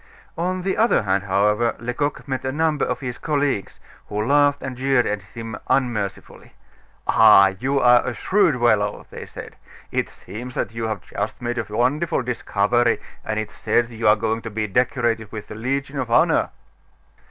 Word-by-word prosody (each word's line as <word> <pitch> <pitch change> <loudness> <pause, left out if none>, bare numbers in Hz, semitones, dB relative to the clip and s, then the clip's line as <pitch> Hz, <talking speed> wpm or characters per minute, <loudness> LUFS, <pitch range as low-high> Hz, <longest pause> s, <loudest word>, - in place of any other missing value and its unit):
On 180 +2 -2
the 190 0 -1
other 225 - +3
hand, 100 0 0
however, 105 +4 +2
Lecoq 125 +6 -3
met 130 -1 -3
a 130 - -1
number 155 0 0
of 125 -1 -2
his 125 -2 -5
colleagues, 145 -8 -1 0.3
who 105 +1 -2
laughed 145 +1 +3
and 130 -1 -5
jeered 135 -1 +2
at 105 -1 -2
him 115 +3 -8
unmercifully. 110 -7 -2 0.5
"Ah! 95 0 +6
you 135 +3 +1
are 125 -1 +5
a 125 - -3
shrewd 185 - +2
fellow!" 105 -4 +1
they - - -8
said, - - -10 0.3
"it - - -1
seems 120 +7 -9
that - - -2
you 115 0 -3
have 110 -2 -3
just 105 +1 -4
made 120 0 -3
a - - -2
wonderful 135 +8 0
discovery, 120 -1 +1 0.2
and 110 0 -2
it's 110 - -6
said 120 0 +1
you 115 0 -2
are 105 - +7
going 110 +1 -2
to 115 - -6
be 110 0 -2
decorated 115 0 0
with 110 -2 -8
the - - -6
Legion 135 +5 -3
of 125 - -3
Honor." 115 - +3
120 Hz, 175 wpm, -22 LUFS, 110-135 Hz, 0.5 s, are